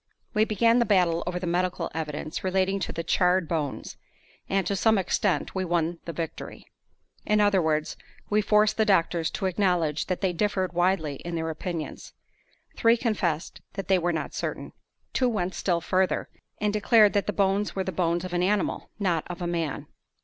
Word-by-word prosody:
We 215 Hz, +1 st, +3 dB
began 230 Hz, +2 st, +3 dB
the 235 Hz, -, +3 dB
battle 180 Hz, -5 st, +3 dB
over 180 Hz, 0 st, -2 dB
the 180 Hz, -, -4 dB
medical 175 Hz, 0 st, -1 dB
evidence 155 Hz, 0 st, -4 dB
relating 190 Hz, +1 st, +1 dB
to 185 Hz, -, -3 dB
the 165 Hz, -, -4 dB
charred 180 Hz, +1 st, +2 dB
bones; 150 Hz, -4 st, -3 dB, 0.5 s
and, 195 Hz, -1 st, +1 dB
to 200 Hz, -, 0 dB
some 220 Hz, +2 st, +3 dB
extent, 190 Hz, +1 st, 0 dB
we 190 Hz, -, -1 dB
won 170 Hz, -1 st, -1 dB
the 170 Hz, -, -4 dB
victory. 165 Hz, 0 st, -6 dB, 0.6 s
In 210 Hz, 0 st, +2 dB
other 205 Hz, -2 st, +4 dB
words, 155 Hz, 0 st, -1 dB, 0.3 s
we 210 Hz, +1 st, +2 dB
forced 210 Hz, 0 st, +3 dB
the 220 Hz, -, +4 dB
doctors 170 Hz, -4 st, +2 dB
to -, -, -4 dB
acknowledge 180 Hz, -5 st, +1 dB
that 185 Hz, -, -2 dB
they 190 Hz, -3 st, +1 dB
differed 190 Hz, -1 st, 0 dB
widely 175 Hz, -5 st, +1 dB
in 170 Hz, +3 st, -6 dB
their 160 Hz, 0 st, -2 dB
opinions. 160 Hz, 0 st, -6 dB, 0.6 s
Three 230 Hz, +1 st, +4 dB
confessed 190 Hz, -9 st, -2 dB
that 195 Hz, -1 st, -6 dB
they 190 Hz, -1 st, +4 dB
were 175 Hz, 0 st, 0 dB
not 160 Hz, -2 st, -3 dB
certain. -, -, -4 dB, 0.4 s
Two 255 Hz, -1 st, +2 dB
went 190 Hz, -5 st, -2 dB
still 175 Hz, -3 st, 0 dB
further, 185 Hz, +2 st, 0 dB, 0.3 s
and 210 Hz, 0 st, 0 dB
declared 210 Hz, 0 st, +5 dB
that 205 Hz, -1 st, 0 dB
the -, -, +1 dB
bones 200 Hz, 0 st, 0 dB
were 190 Hz, -, 0 dB
the 190 Hz, -, -3 dB
bones 170 Hz, 0 st, 0 dB
of 180 Hz, -, -6 dB
an 175 Hz, -, +1 dB
animal, 200 Hz, +2 st, 0 dB
not 180 Hz, -6 st, 0 dB
of 180 Hz, 0 st, -6 dB
a 175 Hz, -, -3 dB
man. 170 Hz, -4 st, -2 dB
185 Hz, 185 wpm, -26 LUFS, 170-200 Hz, 0.6 s, declared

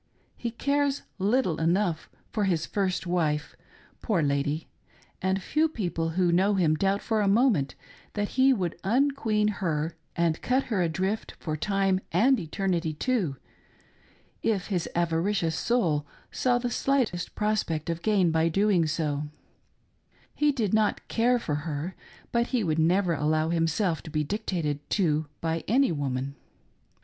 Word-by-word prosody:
He 235 Hz, -, -3 dB
cares 280 Hz, +4 st, 0 dB, 0.2 s
little 200 Hz, -4 st, +1 dB
enough 170 Hz, 0 st, +1 dB, 0.2 s
for 210 Hz, -3 st, 0 dB
his 170 Hz, -4 st, +1 dB
iirst 190 Hz, -3 st, -1 dB
wife, 160 Hz, -4 st, 0 dB, 0.5 s
poor 195 Hz, -9 st, +1 dB
lady, 145 Hz, +2 st, 0 dB, 0.5 s
and 190 Hz, +1 st, +1 dB
few 315 Hz, +8 st, +2 dB
people 175 Hz, -, -2 dB
who 180 Hz, -2 st, +3 dB
know 195 Hz, +4 st, +3 dB
him 170 Hz, -5 st, +3 dB
doubt 195 Hz, +5 st, +1 dB
for 220 Hz, -2 st, +1 dB
a 205 Hz, -, +2 dB
moment 200 Hz, -, +3 dB, 0.4 s
that 205 Hz, -1 st, -1 dB
he 265 Hz, +1 st, +4 dB
would 185 Hz, -9 st, 0 dB
un 260 Hz, +9 st, +3 dB
queen 215 Hz, -6 st, 0 dB
her 165 Hz, -6 st, -1 dB, 0.2 s
and 170 Hz, -2 st, +1 dB
cut 260 Hz, +2 st, +1 dB
her 190 Hz, -, +2 dB
adrift 190 Hz, +5 st, -1 dB
for 155 Hz, -2 st, -3 dB
time 195 Hz, +3 st, +1 dB
and 260 Hz, +2 st, +4 dB
eternity 170 Hz, -1 st, -1 dB
too, 195 Hz, -, 0 dB, 1.1 s
if 205 Hz, -4 st, 0 dB
his 180 Hz, -5 st, -1 dB
avaricious 170 Hz, 0 st, +1 dB
soul 160 Hz, -13 st, +1 dB, 0.2 s
saw 245 Hz, -1 st, +2 dB
the 245 Hz, 0 st, -2 dB
slightest 245 Hz, -10 st, 0 dB
prospect 210 Hz, -8 st, -1 dB
of 170 Hz, 0 st, -2 dB
gain 195 Hz, -4 st, +3 dB
by 160 Hz, +1 st, +2 dB
doing 195 Hz, -2 st, +2 dB
so 150 Hz, -1 st, -1 dB, 0.5 s
— -, -, -36 dB
he 295 Hz, 0 st, +2 dB
did 225 Hz, -8 st, -1 dB
not 215 Hz, -1 st, +1 dB
care 245 Hz, +2 st, +3 dB
for 170 Hz, -10 st, -3 dB, 0.2 s
her, 155 Hz, +5 st, -3 dB, 0.4 s
but 235 Hz, 0 st, +1 dB
he 250 Hz, -4 st, 0 dB
never 170 Hz, +2 st, +2 dB
would 150 Hz, -, -3 dB
allow 155 Hz, +1 st, +2 dB
himself 165 Hz, +1 st, +1 dB
to 160 Hz, -, -10 dB
be 155 Hz, -1 st, 0 dB
dictated 160 Hz, -4 st, -2 dB
to 155 Hz, -6 st, +1 dB
by 165 Hz, 0 st, -1 dB
any 260 Hz, +3 st, +3 dB
woman. 140 Hz, -3 st, -2 dB
185 Hz, 150 wpm, -27 LUFS, 160-215 Hz, 1.1 s, he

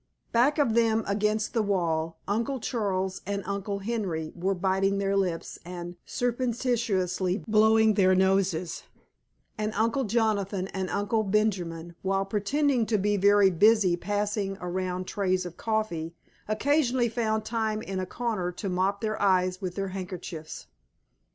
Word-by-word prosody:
Back 255 Hz, +6 st, +3 dB
of 280 Hz, -7 st, +2 dB
them 225 Hz, -1 st, +3 dB
against 210 Hz, +2 st, 0 dB
the 230 Hz, -, +2 dB
wall 165 Hz, -5 st, 0 dB
Uncle 230 Hz, +6 st, -1 dB
Charles 190 Hz, -5 st, -2 dB
and 200 Hz, -1 st, -2 dB
Uncle 200 Hz, 0 st, -3 dB
Henry 195 Hz, -7 st, -3 dB
were 190 Hz, +3 st, 0 dB
biting 190 Hz, +2 st, +1 dB
their 195 Hz, 0 st, 0 dB
lips 180 Hz, -4 st, -1 dB
and 175 Hz, 0 st, -7 dB
surreptitiously 230 Hz, -7 st, 0 dB
blowing 220 Hz, 0 st, +5 dB
their 185 Hz, -2 st, +4 dB
noses, 190 Hz, -3 st, +1 dB, 0.8 s
and 215 Hz, 0 st, -1 dB
Uncle 230 Hz, +4 st, +1 dB
Jonathan 205 Hz, -4 st, 0 dB
and 190 Hz, -1 st, -3 dB
Uncle 205 Hz, +2 st, 0 dB
Benjamin, 185 Hz, -5 st, -1 dB
while 195 Hz, 0 st, 0 dB
pretending 235 Hz, +5 st, +1 dB
to 220 Hz, -, +2 dB
be 205 Hz, +1 st, +1 dB
very 200 Hz, 0 st, +5 dB
busy 205 Hz, 0 st, +4 dB
passing 205 Hz, +1 st, -2 dB
around 180 Hz, 0 st, -3 dB
trays 185 Hz, -2 st, 0 dB
of 175 Hz, -1 st, -7 dB
coffee, 175 Hz, -8 st, -2 dB, 0.3 s
occasionally 255 Hz, +2 st, +2 dB
found 220 Hz, -2 st, -1 dB
time 220 Hz, -1 st, -1 dB
in 190 Hz, 0 st, -4 dB
a 185 Hz, -, -3 dB
corner 215 Hz, -6 st, -2 dB
to 195 Hz, +3 st, -4 dB
mop 190 Hz, +2 st, 0 dB
their 215 Hz, -1 st, -2 dB
eyes 185 Hz, -1 st, +2 dB
with 180 Hz, -2 st, -4 dB
their 195 Hz, -1 st, -2 dB
handkerchiefs. 180 Hz, -4 st, -7 dB
200 Hz, 140 wpm, -27 LUFS, 185-220 Hz, 0.8 s, blowing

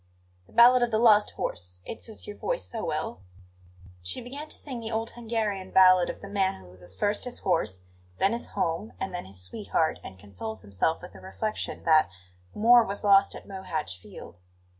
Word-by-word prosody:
"The -, -, -22 dB
ballad 245 Hz, +2 st, +7 dB
of 240 Hz, -, +2 dB
the 220 Hz, -, +1 dB
lost 215 Hz, -2 st, +6 dB
horse; 90 Hz, +1 st, -4 dB
it -, -, -7 dB
suits 220 Hz, -2 st, -9 dB
your 205 Hz, -, -7 dB
voice -, -, -2 dB
so 225 Hz, -2 st, -5 dB
well." 155 Hz, -10 st, -3 dB, 0.8 s
She 90 Hz, +1 st, -3 dB
began 280 Hz, +5 st, -8 dB
to -, -, -2 dB
sing 260 Hz, -5 st, -6 dB
the 225 Hz, -1 st, -5 dB
old 225 Hz, 0 st, -2 dB
Hungarian 220 Hz, -5 st, -2 dB
ballad 185 Hz, -1 st, +6 dB
of -, -, -6 dB
the 200 Hz, -, -8 dB
man 195 Hz, -1 st, 0 dB
who 90 Hz, -1 st, -14 dB
loses 90 Hz, 0 st, -8 dB
first 205 Hz, -, 0 dB
his 250 Hz, -1 st, -4 dB
horse, 130 Hz, -, -1 dB, 0.3 s
then 195 Hz, -, +3 dB
his 235 Hz, -, -2 dB
home, 170 Hz, +6 st, -1 dB
and 190 Hz, -1 st, -4 dB
then 180 Hz, -, -4 dB
his 95 Hz, 0 st, -5 dB
sweetheart, 90 Hz, 0 st, -1 dB
and 95 Hz, -, -10 dB
consoles 105 Hz, +3 st, -6 dB
himself 100 Hz, -, -1 dB
with 180 Hz, -, -10 dB
the -, -, -13 dB
reflection 215 Hz, +3 st, -4 dB
that 155 Hz, -1 st, +5 dB, 0.5 s
"more 235 Hz, +3 st, +7 dB
was 200 Hz, -1 st, -4 dB
lost 200 Hz, -1 st, +5 dB
at -, -, -11 dB
Mohacz 185 Hz, -, -4 dB
field." 90 Hz, -1 st, -12 dB
195 Hz, 195 wpm, -27 LUFS, -, 0.8 s, ballad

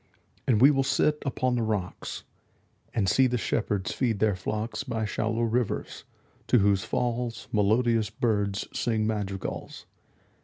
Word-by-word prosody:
And 115 Hz, -5 st, +4 dB
we 135 Hz, +5 st, +8 dB
will 135 Hz, -2 st, +2 dB
sit 150 Hz, +2 st, +1 dB
upon 130 Hz, -1 st, 0 dB
the 120 Hz, -, +1 dB
rocks, 105 Hz, -5 st, -3 dB, 0.6 s
5 -, -, -34 dB
And 100 Hz, -4 st, +1 dB
see 130 Hz, +6 st, +4 dB
the 125 Hz, 0 st, 0 dB
shepherds 105 Hz, -4 st, -1 dB
feed 120 Hz, -5 st, 0 dB
their 105 Hz, -1 st, +2 dB
flocks 110 Hz, +7 st, -3 dB
By 115 Hz, -5 st, -2 dB
shallow 110 Hz, +3 st, -1 dB
rivers, 115 Hz, -1 st, -1 dB, 0.4 s
to -, -, +5 dB
whose 100 Hz, -2 st, +3 dB
falls 120 Hz, 0 st, -2 dB
Melodious 110 Hz, +1 st, +2 dB
birds 105 Hz, -3 st, -1 dB
sing 110 Hz, -2 st, 0 dB
madrigals. 100 Hz, -3 st, -4 dB
110 Hz, 145 wpm, -27 LUFS, 105-125 Hz, 0.6 s, we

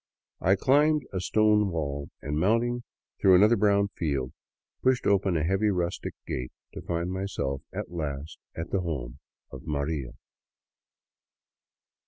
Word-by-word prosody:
I 95 Hz, +2 st, +4 dB
climbed 145 Hz, +7 st, +3 dB
a 95 Hz, -, -1 dB
stone 105 Hz, +2 st, +3 dB
wall 70 Hz, -4 st, -3 dB
and, 75 Hz, +2 st, -1 dB
mounting 115 Hz, +6 st, +2 dB, 0.4 s
through 95 Hz, -1 st, +7 dB
another 105 Hz, +5 st, +6 dB
brown 100 Hz, -1 st, +3 dB
field, 70 Hz, -9 st, -2 dB, 0.5 s
pushed 130 Hz, -1 st, +2 dB
open 95 Hz, -3 st, +3 dB
a 75 Hz, -, 0 dB
heavy 95 Hz, +5 st, +2 dB
rustic 90 Hz, -3 st, -2 dB
gate, 60 Hz, 0 st, -4 dB, 0.2 s
to -, -, -6 dB
find 85 Hz, +1 st, -2 dB
myself 80 Hz, -9 st, -2 dB
at -, -, -5 dB
last 75 Hz, -2 st, -5 dB, 0.2 s
at 80 Hz, +1 st, -5 dB
the 95 Hz, -, +1 dB
home 70 Hz, -9 st, -4 dB, 0.3 s
of -, -, -8 dB
" -, -, -18 dB
Maria." 70 Hz, -3 st, -2 dB
90 Hz, 140 wpm, -28 LUFS, 75-105 Hz, 0.5 s, through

